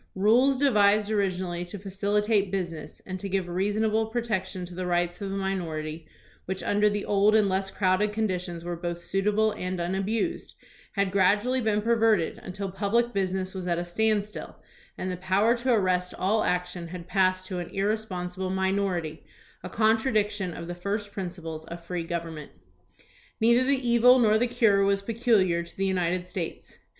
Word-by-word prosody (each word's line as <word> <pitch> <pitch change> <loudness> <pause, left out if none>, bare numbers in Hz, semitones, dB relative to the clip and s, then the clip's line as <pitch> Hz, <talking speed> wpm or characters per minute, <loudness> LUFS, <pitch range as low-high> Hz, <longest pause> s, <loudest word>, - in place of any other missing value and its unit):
Rules 240 +8 +4
devised 210 -6 +3
originally 185 -4 -1
to 180 +4 -7
facilitate 200 +1 0
business 170 -5 -5
and 185 0 -5
to 200 - -5
give 190 -1 -1
reasonable 215 +4 0
protection 210 -6 -2
to 175 - -10
the 180 +1 -4
rights 175 +1 0
of 200 - -3
the 195 - -3
minority, 165 -5 -3 0.4
which 190 +1 -4
mider 210 +1 +3
the 205 0 -2
old 205 +1 +3
and 215 -2 +4
less 190 0 0
crowded 195 +2 +1
conditions 180 -5 -2
were 175 0 -3
both 170 0 -4
suitable 210 +4 +1
and 180 -2 -4
unabused, 195 - -2 0.4
had 200 -2 0
gradually 205 +7 +2
been 210 -2 +1
perverted 225 -6 +2
until 195 +1 -5
public 220 +5 0
business 190 -1 -1
was 185 -2 -5
at 170 -1 +1
a 175 - -2
standstill, 210 +3 -1 0.4
and 185 - -3
the 180 - -4
power 190 +6 +2
to 250 +1 0
arrest 185 -5 +1
all 215 +4 +1
action 180 -1 -2
had 175 0 -8
passed 185 -1 +1
to 185 -2 -4
an 175 -1 -5
irresponsible 190 -3 -2
minority, 190 -4 -1 0.4
a 180 - -6
contradiction 215 -3 +1
of 170 0 -7
the 175 - -4
first 200 +3 -3
principles 175 -5 -6
of 170 +1 -9
free 175 0 -3
government. 165 -3 -5 0.9
Neither 235 +3 +4
the 265 -1 0
evil 240 +2 +6
nor 220 -3 +4
the 245 - +2
cure 225 -5 +3
was 200 0 +1
peculiar 215 -6 +2
to 170 - -11
the 195 - 0
United 180 -1 0
States. 180 -2 -6
195 Hz, 165 wpm, -27 LUFS, 180-215 Hz, 0.9 s, evil